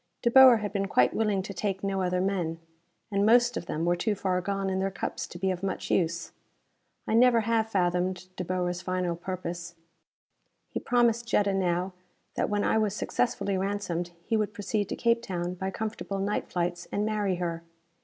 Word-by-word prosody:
De 235 - +3
Boer 260 -2 +9
had 210 -1 -4
been 195 -1 0
quite 125 -9 +3
willing 210 -3 +1
to 200 - -6
take 195 0 -2
no 195 -1 0
other 180 0 0
men 180 -4 -1 0.5
and 200 0 +2
most 240 +2 +5
of 170 - -4
them 160 +2 -2
were 175 0 +3
too 210 +4 0
far 185 -2 0
gone 195 +1 -2
in 190 0 0
their 195 +1 0
cups 195 - -4
to - - -9
be 190 +1 0
of 180 -1 -4
much 195 -1 -3
use. 170 -1 0 0.8
I - - 0
never 235 0 +5
have 225 0 +1
fathomed 180 -1 0
De 185 - -3
Boer's 180 0 -2
final 185 -2 -1
purpose. 175 -1 -5 1.0
He - - -2
promised 235 -1 +2
Jetta 205 -4 +2
now 185 0 0 0.4
that - - -1
when 205 0 0
I 220 - +2
was 210 -2 0
successfully 200 -5 -1
ransomed 190 -3 -2 0.2
he 225 - 0
would 215 0 -1
proceed 205 -1 -2
to - - -2
Cape 235 0 +2
Town 180 -5 -3
by 190 +1 -3
comfortable 210 -1 -4
night 200 +2 -1
flights 175 0 -2
and 205 - 0
marry 210 -3 0
her. 170 -2 -3
195 Hz, 195 wpm, -28 LUFS, 180-210 Hz, 1.0 s, Boer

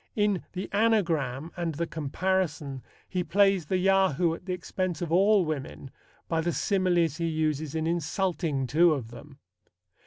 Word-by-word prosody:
In 205 -4 +1
The 185 +1 -4
Anagram 170 - +1
and 170 -3 -3
The 170 +3 -1
Comparison 160 -3 -2 0.3
he 180 -1 -2
plays 195 -3 +2
the 185 - +1
Yahoo 185 -3 +3
at 175 - -10
the - - -2
expense 180 -1 -3
of 165 - -4
all 195 +2 +4
women 140 -3 -5 0.4
by 165 -1 0
the 170 +1 -1
similes 175 -6 +1
he 170 - -1
uses 155 -2 -1
in 160 0 -1
insulting 165 -3 -1
two 160 +5 +4
of 115 -5 -6
them. 135 +4 -12
170 Hz, 155 wpm, -27 LUFS, 155-190 Hz, 0.4 s, all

